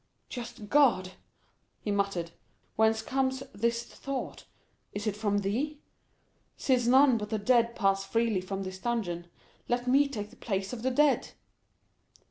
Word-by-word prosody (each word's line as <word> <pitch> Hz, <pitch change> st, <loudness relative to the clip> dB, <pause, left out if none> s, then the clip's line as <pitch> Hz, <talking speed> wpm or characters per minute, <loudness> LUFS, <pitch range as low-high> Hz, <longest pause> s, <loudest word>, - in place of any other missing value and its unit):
"Just 235 Hz, -3 st, -7 dB
God!" 230 Hz, -8 st, +4 dB, 0.7 s
he 210 Hz, -, -3 dB
muttered, 195 Hz, -4 st, -1 dB, 0.4 s
"whence 220 Hz, 0 st, +3 dB
comes 265 Hz, +1 st, 0 dB
this 230 Hz, +3 st, 0 dB
thought? 275 Hz, +2 st, -6 dB, 0.5 s
Is 205 Hz, +1 st, -4 dB
it 210 Hz, -2 st, 0 dB
from 205 Hz, -1 st, 0 dB
thee? 260 Hz, +10 st, -1 dB, 0.8 s
Since 250 Hz, -3 st, +2 dB
none 260 Hz, -1 st, +6 dB
but 210 Hz, 0 st, -5 dB
the 220 Hz, -, 0 dB
dead 235 Hz, +2 st, +3 dB
pass 195 Hz, -2 st, +2 dB
freely 225 Hz, -1 st, +1 dB
from 195 Hz, +1 st, -4 dB
this 185 Hz, 0 st, -6 dB
dungeon, 190 Hz, -7 st, -2 dB, 0.4 s
let 245 Hz, 0 st, 0 dB
me 275 Hz, +3 st, +5 dB
take 210 Hz, -6 st, -5 dB
the -, -, -17 dB
place 195 Hz, -1 st, -2 dB
of 235 Hz, -, -5 dB
the 260 Hz, -, +1 dB
dead!" 285 Hz, +2 st, +2 dB
225 Hz, 145 wpm, -29 LUFS, 200-250 Hz, 0.8 s, none